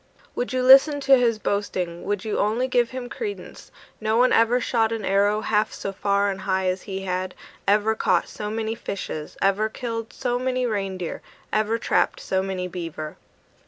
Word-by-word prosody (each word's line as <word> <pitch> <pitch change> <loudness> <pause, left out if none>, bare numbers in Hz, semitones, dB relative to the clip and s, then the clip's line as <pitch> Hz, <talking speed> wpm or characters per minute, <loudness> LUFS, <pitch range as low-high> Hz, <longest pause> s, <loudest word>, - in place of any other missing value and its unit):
Would 245 - -3
you 255 0 0
listen 270 +3 +7
to 275 0 +6
his 235 -3 +2
boasting, 185 -5 -2
Would 205 0 -2
you 215 - -1
only 225 +5 +1
give 245 -2 +2
him 255 -1 -6
credence, 410 - -7 0.3
No 220 +1 +1
one 250 +1 +4
ever 230 +2 +4
shot 230 -2 +1
an 225 -3 -3
arrow 205 +2 +2
Half 215 0 +1
so 195 - -4
far 200 +1 +1
and 195 - -6
high 190 -1 0
as 185 0 -2
he 190 0 -3
had; 185 0 -3 0.3
Ever 210 +2 +3
caught - - +1
so 210 -1 -5
many 220 0 -2
fishes, 185 -8 -6
Ever 200 +3 +2
killed 230 -1 -5
so 245 -1 -2
many 255 0 0
reindeer, 195 -6 -3 0.3
Ever 215 +1 +1
trapped - - +1
so 190 0 -1
many 190 -1 -3
beaver! 165 -4 -6
215 Hz, 180 wpm, -24 LUFS, 195-240 Hz, 0.3 s, listen